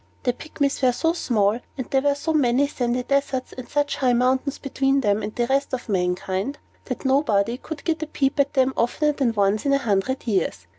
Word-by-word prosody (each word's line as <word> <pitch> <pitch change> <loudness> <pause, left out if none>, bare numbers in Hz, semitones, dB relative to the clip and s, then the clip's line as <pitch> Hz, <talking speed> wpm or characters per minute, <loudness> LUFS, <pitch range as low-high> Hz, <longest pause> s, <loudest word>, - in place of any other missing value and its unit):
The 245 - +1
Pygmies 285 0 -2
were 255 -2 +4
so 325 +6 +1
small, 220 - +1 0.2
and 260 - -4
there 270 - +3
were 285 0 +2
so 320 +3 -2
many 270 -2 +3
sandy 250 -2 -1
deserts 275 -1 -1
and 255 -2 -9
such 290 0 0
high 255 -2 +2
mountains 260 +3 +1
between 275 0 0
them 205 -2 +1
and 210 +1 -5
the 240 - +1
rest 270 +1 0
of 245 - -9
mankind, 190 +5 -1 0.3
that - - -5
nobody 245 -5 +2
could 310 -1 -8
get 325 -1 -1
a 315 - -3
peep 275 -1 -1
at 280 +1 +2
them 265 0 +3
oftener 300 +6 +1
than 270 -5 0
once 205 +1 +2
in 280 - +2
a - - +5
hundred 235 0 -1
years. 185 - -1
260 Hz, 210 wpm, -23 LUFS, 230-280 Hz, 0.3 s, a